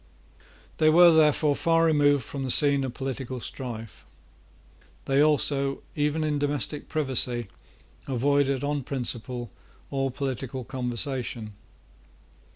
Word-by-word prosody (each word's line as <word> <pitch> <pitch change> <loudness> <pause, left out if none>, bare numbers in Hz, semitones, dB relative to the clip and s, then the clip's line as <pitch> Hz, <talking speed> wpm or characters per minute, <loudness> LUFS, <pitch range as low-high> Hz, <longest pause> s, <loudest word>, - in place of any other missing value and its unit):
They 155 - +4
were, 170 +2 +7
therefore, 150 -2 +4
far 165 +1 +2
removed 145 -4 +3
from 135 +5 -6
the 130 - -3
scene 140 +1 +3
of 130 -2 -4
political 130 -1 -4
strife. 115 -3 -7 1.0
They 135 +1 +3
also, 140 -2 +1
even 150 +1 0
in 150 -1 0
domestic 145 +1 -2
privacy, 125 -6 0 0.6
avoided 140 +1 +1
on 145 0 -1
principle 125 -2 -3 0.4
all 135 -1 0
political 130 -1 -4
conversation. 125 -3 -4
140 Hz, 110 wpm, -26 LUFS, 125-145 Hz, 1.0 s, were